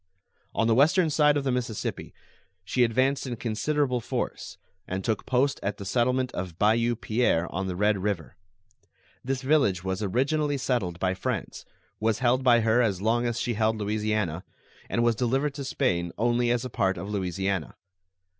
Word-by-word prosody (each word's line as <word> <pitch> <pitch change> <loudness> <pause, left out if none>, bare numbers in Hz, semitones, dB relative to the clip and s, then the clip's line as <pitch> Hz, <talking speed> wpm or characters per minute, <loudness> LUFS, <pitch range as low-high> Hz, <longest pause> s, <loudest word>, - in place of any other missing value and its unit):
On 115 - +2
the 115 - +3
western 155 - +4
side 150 -1 +4
of 140 - -1
the 135 - 0
Mississippi 120 -4 -3 0.5
she 125 +6 +2
advanced 130 +4 +1
in 120 - -3
considerable 125 +3 -1
force, - - -4 0.3
and 95 +1 -3
took 110 -1 -2
post 135 +2 +1
at 100 +1 -2
the 100 - -7
settlement 125 +4 +1
of 90 -2 -5
Bayou 115 +4 +2
Pierre, 110 -7 +1
on 95 +2 -2
the 90 - -3
Red 105 +1 +2
River. 95 -5 -3 0.9
This 130 +1 -2
village 130 - +2
was 95 +1 -2
originally 140 +8 0
settled 120 -10 -1
by 95 0 +1
France, 95 - -4 0.3
was 110 0 +1
held 130 +1 +2
by 120 -2 +5
her 115 +2 +3
as 100 -6 +1
long 115 +4 +1
as 120 -1 -2
she 120 - -1
held 110 0 +1
Louisiana, 105 -5 -1 0.5
and 120 - +1
was 120 0 +4
delivered 135 +5 0
to 140 0 -6
Spain 90 -11 0
only 120 +1 +1
as 120 +1 0
a - - -4
part 95 -3 0
of 90 +4 -5
Louisiana. 95 -3 -2
115 Hz, 175 wpm, -27 LUFS, 100-130 Hz, 0.9 s, by